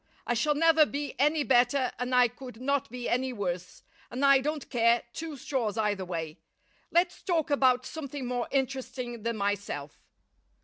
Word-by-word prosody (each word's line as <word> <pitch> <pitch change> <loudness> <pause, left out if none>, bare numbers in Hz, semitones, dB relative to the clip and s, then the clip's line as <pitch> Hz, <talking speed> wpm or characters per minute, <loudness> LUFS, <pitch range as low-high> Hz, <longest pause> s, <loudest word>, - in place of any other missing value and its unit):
I - - +1
shall 295 +6 +1
never 320 0 +5
be 285 +1 -4
any 300 +2 +3
better 255 0 +3
and 250 0 -1
I 250 -1 +6
could 245 -1 -11
not 280 +1 0
be 245 +1 -5
any 260 +2 0
worse, 180 -5 -4 0.3
and 260 +4 -1
I 275 -1 +7
don't 300 +1 -3
care 235 -1 +3
two 320 -3 -6
straws 235 -5 -2
either 205 -3 0
way. 165 -2 -5 0.5
Let's 350 +1 +1
talk 330 -5 0
about 255 -3 +3
something 285 -3 -6
more 245 -1 -2
interesting 260 -3 -2
than 230 0 -2
myself. 200 -8 -3
250 Hz, 165 wpm, -29 LUFS, 230-280 Hz, 0.5 s, I